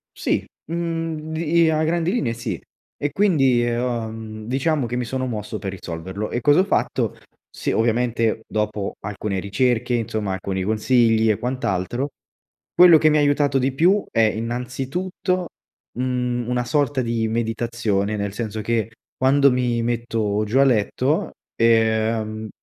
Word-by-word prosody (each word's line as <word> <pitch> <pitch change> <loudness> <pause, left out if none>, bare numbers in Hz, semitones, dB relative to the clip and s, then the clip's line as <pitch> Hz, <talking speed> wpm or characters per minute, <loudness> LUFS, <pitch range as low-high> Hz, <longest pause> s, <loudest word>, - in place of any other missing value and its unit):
Sì, - - -1 0.3
mhmm, 165 -2 -3
di 165 +1 +2
a 155 0 +1
grandi 170 +2 +1
linee 130 - 0
sì, 115 -7 -5 0.4
e 145 0 -2
quindi, 135 -11 +3
ehm, 120 0 0
uhm, 110 -3 -4
diciamo 140 +1 0
che 120 +1 -4
mi 125 -1 -1
sono 130 +2 -2
mosso 110 -3 -4
per 95 -1 -5
risolverlo 95 +3 -5
e 120 - -2
cosa 145 +7 +4
ho - - +5
fatto? - - 0 0.3
Sì, - - -3
ovviamente 115 -1 +1
dopo 105 -2 -2
alcune 100 0 -3
ricerche 120 +5 0
insomma, 110 -3 -2
alcuni 95 0 -3
consigli 110 +1 +3
e 105 - -2
quant’altro, 120 +1 -2 0.6
quello 175 -2 +8
che 155 0 +4
mi 150 - +3
ha - - +3
aiutato 145 -1 +2
di 130 +1 +1
più 185 +8 +3
è 115 - +2
innanzitutto 130 - -2 0.5
un 125 -1 -1
una 125 0 -1
sorta 145 -1 +1
di 115 -1 -1
meditazione, 115 -2 -1
nel 100 -1 -3
senso 110 -1 -4
che 115 0 -1 0.2
quando 140 +1 +4
mi 120 -2 0
metto 115 -3 -1
giù 115 +6 0
a 135 - +7
letto, 130 +4 +1 0.2
ehm, 110 -1 +1
120 Hz, 150 wpm, -22 LUFS, 110-140 Hz, 0.6 s, quello